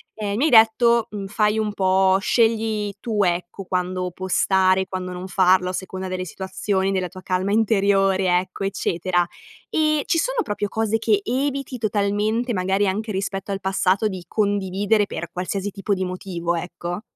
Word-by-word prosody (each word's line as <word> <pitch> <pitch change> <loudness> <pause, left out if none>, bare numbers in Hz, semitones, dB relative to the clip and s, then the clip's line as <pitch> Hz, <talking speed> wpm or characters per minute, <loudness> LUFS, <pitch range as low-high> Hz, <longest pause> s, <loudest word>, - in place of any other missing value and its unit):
ehm, 205 -2 -3
mi 270 - +2
hai - - +3
detto, 235 0 +5
mhmm, 205 -2 -5
fai 210 +1 +1
un 210 -1 -1
po' 190 -1 +3
scegli 220 -1 +1
tu, 210 -2 0
ecco, 175 +2 -2
quando 180 0 -2
postare, 190 +1 +2
quando 185 -1 -5
non 180 +1 -6
farlo 185 -1 +3
a - - -4
seconda 190 0 -5
delle 185 0 -3
situazioni, 190 +2 -2
della 185 -2 -1
tua 185 +1 -11
calma 185 +1 -1
interiore, 195 -4 +3
ecco, 185 +1 -7
eccetera. 175 -2 0 0.4
Ehm, 305 -1 +2
ci 330 - +1
sono - - 0
proprio 210 -1 -2
cose 220 +1 0
che 220 -2 +2
eviti 270 +2 -2
totalmente, 215 +2 0
magari 190 +1 +1
anche 215 +4 -2
rispetto 195 0 -3
al 195 - -2
passato 190 +2 +1
di 190 -3 -5
condividere, 205 +1 +1
per 170 -4 -6
qualsiasi 195 +3 -3
tipo 200 +1 -2
di 190 -1 -1
motivo, 180 -2 -3
ecco? 175 +2 -5
195 Hz, 165 wpm, -22 LUFS, 185-215 Hz, 0.4 s, detto